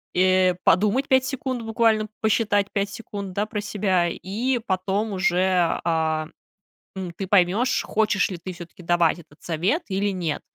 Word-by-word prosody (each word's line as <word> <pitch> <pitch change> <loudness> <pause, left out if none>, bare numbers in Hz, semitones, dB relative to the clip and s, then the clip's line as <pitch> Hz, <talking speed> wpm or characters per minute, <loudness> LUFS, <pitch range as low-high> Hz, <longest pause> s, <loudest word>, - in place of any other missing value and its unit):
э, 185 0 +4
подумать 210 +9 +3
5 260 -1 +3
секунд, 260 -2 -3
буквально 225 -1 +2
посчитать 205 -2 +2
5 200 -1 0
секунд, 200 -3 -7
да, 205 +3 0
про 215 -1 -4
себя, 190 -4 +1
и 230 +10 -2
потом 195 +3 -1
уже, 185 -1 +2
э, 160 -2 0 0.7
м, 185 -2 -4
ты 195 - -3
поймёшь, 205 +6 +2
хочешь 215 -1 +1
ли 185 - -5
ты 180 +2 -7
всё-таки 175 +1 -12
давать 175 -1 +2
этот 145 -2 -18
совет 180 - 0
или 200 +1 0
нет, 170 -5 -3
195 Hz, 155 wpm, -24 LUFS, 180-215 Hz, 0.7 s, э